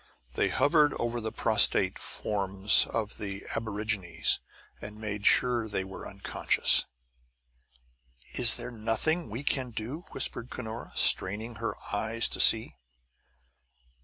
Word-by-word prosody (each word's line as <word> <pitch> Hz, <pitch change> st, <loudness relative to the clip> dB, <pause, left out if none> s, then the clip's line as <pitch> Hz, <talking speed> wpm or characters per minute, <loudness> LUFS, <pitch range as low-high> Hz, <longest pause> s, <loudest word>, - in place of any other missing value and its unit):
They -, -, 0 dB
hovered 150 Hz, -1 st, +2 dB
over 120 Hz, 0 st, -3 dB
the 110 Hz, 0 st, -5 dB
prostrate -, -, +2 dB
forms 100 Hz, 0 st, +2 dB
of 110 Hz, -2 st, -4 dB
the 100 Hz, -1 st, -6 dB
aborigines 105 Hz, -7 st, -1 dB, 0.4 s
and 105 Hz, 0 st, -9 dB
made 105 Hz, -1 st, -3 dB
sure 120 Hz, -2 st, +3 dB
that 110 Hz, -, -9 dB
they 95 Hz, -, -1 dB
were 95 Hz, 0 st, -10 dB
unconscious. -, -, +1 dB, 1.5 s
"Is -, -, +6 dB
there -, -, -6 dB
nothing 120 Hz, +9 st, -1 dB
we 115 Hz, +7 st, -6 dB
can 130 Hz, -3 st, -1 dB
do?" 120 Hz, +9 st, -7 dB
whispered 125 Hz, -2 st, -3 dB
Cunora, 115 Hz, -2 st, -8 dB
straining 110 Hz, +4 st, +1 dB
her 115 Hz, -, -4 dB, 0.2 s
eyes 110 Hz, +3 st, 0 dB
to -, -, -3 dB
see. 110 Hz, -, +5 dB
110 Hz, 125 wpm, -28 LUFS, 105-120 Hz, 1.5 s, Is